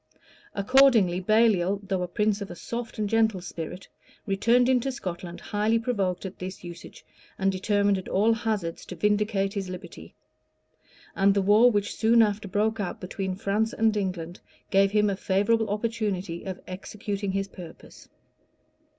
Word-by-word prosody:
Accordingly 215 -4 +4
Baliol, 200 -2 +3
though 190 -2 -1
a 180 - -2
prince 210 +3 0
of 200 - -5
a 175 - -7
soft 235 +7 -6
and 210 -1 -1
gentle 220 -2 +2
spirit, 175 0 -7 0.4
returned 235 +5 +3
into 260 +1 +2
Scotland 175 -6 -6
highly 215 +2 0
provoked 200 -6 -1
at 190 - -7
this 185 0 -7
usage, 175 -1 -11 0.3
and 195 0 +1
determined 200 +1 +1
at 185 - -9
all 215 +4 +3
hazards 215 -7 -2
to - - -7
vindicate 210 -1 +1
his 195 -2 -4
liberty; 180 -1 -9 1.0
and 195 +1 +3
the 200 - +3
war 210 +5 +6
which 205 -3 -1
soon 230 +1 +5
after 210 -1 -1
broke 215 +3 0
out 195 -3 -3
between 190 0 -4
France 210 +4 -1
and 220 -1 +2
England, 180 -3 -3 0.3
gave 195 0 +4
him 210 +1 +2
a 200 - 0
favorable 205 +4 +1
opportunity 205 -5 -2
of 185 -1 -5
executing 200 +1 -5
his 195 0 -1
purpose. 175 -4 -13
200 Hz, 155 wpm, -26 LUFS, 185-220 Hz, 1.0 s, war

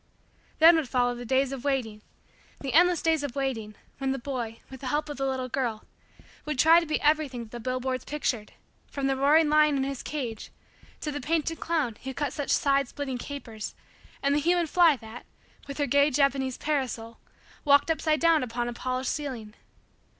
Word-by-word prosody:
Then 330 +1 +8
would 300 -6 -2
follow 245 -1 +2
the 245 0 -7
days 265 +2 +2
of 265 -2 -6
waiting 250 -7 -1 0.6
the 270 -2 -4
endless 350 +1 +4
days 320 -2 +2
of 285 -3 -5
waiting 235 -6 -3 0.2
when 270 -1 0
the - - -3
boy, 240 -4 -4
with 265 -1 -11
the 265 - -5
help 295 +3 -1
of 290 - -6
the 270 0 -1
little 260 -1 -2
girl, 235 -4 -2 0.6
would 300 -3 -3
try 325 +5 +7
to 335 - -5
be 305 - 0
everything 295 -5 +1
that 220 - -14
the 240 - -7
billboards 255 +2 -2
pictured, 260 -7 -3 0.3
from 280 -1 -4
the 270 0 +2
roaring 295 +4 +4
lion 300 -1 +4
in 265 - 0
his 275 -1 -4
cage 245 -8 -5 0.5
to 300 - -3
the 290 0 -4
painted 325 +1 -1
clown 300 -10 -1
who 265 0 -5
cut 290 -3 -2
such 290 - -4
side 275 -2 +2
splitting 265 -2 -5
capers 235 -6 -7 0.5
and 280 0 +3
the 290 - +3
human 345 +3 +2
fly 330 -1 +5
that, 230 -1 -11 0.4
with 280 - -7
her 290 - +1
gay 280 +2 +4
Japanese 270 -2 +1
parasol, 250 -6 -3 0.4
walked 285 +2 +4
upside 310 -1 +1
down 330 0 +4
upon 240 -1 -3
a 240 - -3
polished 255 +1 -2
ceiling. 250 -8 -5
275 Hz, 195 wpm, -27 LUFS, 250-300 Hz, 0.6 s, Then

